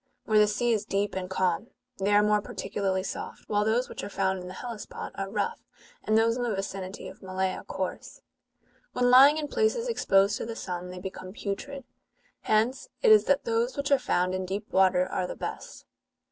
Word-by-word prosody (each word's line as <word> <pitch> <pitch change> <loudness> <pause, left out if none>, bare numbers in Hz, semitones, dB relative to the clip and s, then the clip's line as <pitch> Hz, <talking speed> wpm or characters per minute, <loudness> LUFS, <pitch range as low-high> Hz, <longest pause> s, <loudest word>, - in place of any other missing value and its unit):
Where 215 -1 +4
the 210 - +6
sea 225 +3 +1
is 215 - 0
deep 200 +1 -1
and 185 -1 -4
calm, 185 +2 0 0.3
they 195 +1 +1
are 205 - +6
more 210 0 +3
particularly 190 -2 -2
soft, - - -6
while 210 -1 +1
those 230 +4 +1
which - - -7
are - - -5
found 190 -1 0
in 180 - -8
the 185 - -8
Hellespont 235 -4 -7
are 195 0 -4
rough, 205 0 -2 0.4
and 215 - +2
those 230 +1 +3
in 250 - -3
the 235 -4 0
vicinity 195 -1 -5
of - - -11
Malea 190 0 -2
coarse.^^ - - -5 0.7
"When 245 0 +2
Ipng 280 +4 +8
in 305 -1 -2
places 455 +8 +1
exposed 200 - +3
to - - -4
the 230 - -5
sun, 180 -3 -5
they 180 - -8
become 185 0 -7
putrid: 260 +8 -5 0.6
hence 235 - +1
it 460 - +6
is 430 - +7
that 280 - +2
those 230 +3 0
which 280 0 -2
are 280 - +5
found 180 -7 0
in 185 0 -2
deep 195 +3 -5
water 185 -1 +4
are 180 - -2
the - - -6
best. - - -7
210 Hz, 200 wpm, -28 LUFS, 190-245 Hz, 0.7 s, Ipng